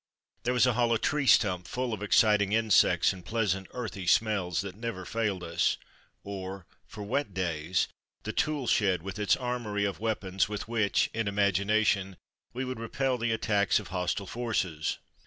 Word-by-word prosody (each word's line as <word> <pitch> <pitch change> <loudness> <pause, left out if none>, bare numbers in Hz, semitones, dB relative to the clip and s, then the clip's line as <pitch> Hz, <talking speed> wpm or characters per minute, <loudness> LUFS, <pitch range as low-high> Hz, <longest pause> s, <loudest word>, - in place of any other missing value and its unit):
There 125 +1 0
was 125 - +5
a 125 - +3
hollow 115 0 +2
tree 145 +4 0
stump 90 -6 +4
full 125 -2 -2
of 105 - -5
exciting 105 -1 +3
insects 110 -4 +4
and 90 -2 -11
pleasant 95 -2 -1
earthy 100 -7 -6
smells 100 -4 +2
that 100 -2 -6
never 110 -4 -5
failed 105 -3 -2
us, 85 0 +1 0.5
or, 95 -2 -6 0.2
for 105 - -8
wet 125 -1 -2
days, 85 -1 0 0.4
the - - -4
tool 150 -4 0
shed, 95 -7 +2
with 95 +2 -6
its 105 -1 +3
armoury 120 -5 -2
of 100 - -3
weapons 100 -4 -1
with 105 -1 -5
which, 110 -3 +1
in 110 -1 -1
imagination, 100 -1 +1 0.3
we 130 +2 -3
would 130 -2 -5
repel 125 +2 -1
the 115 0 0
attacks 105 -3 +2
of 100 -6 -10
hostile 90 +2 -2
forces. 95 -9 -2
105 Hz, 165 wpm, -29 LUFS, 95-115 Hz, 0.5 s, was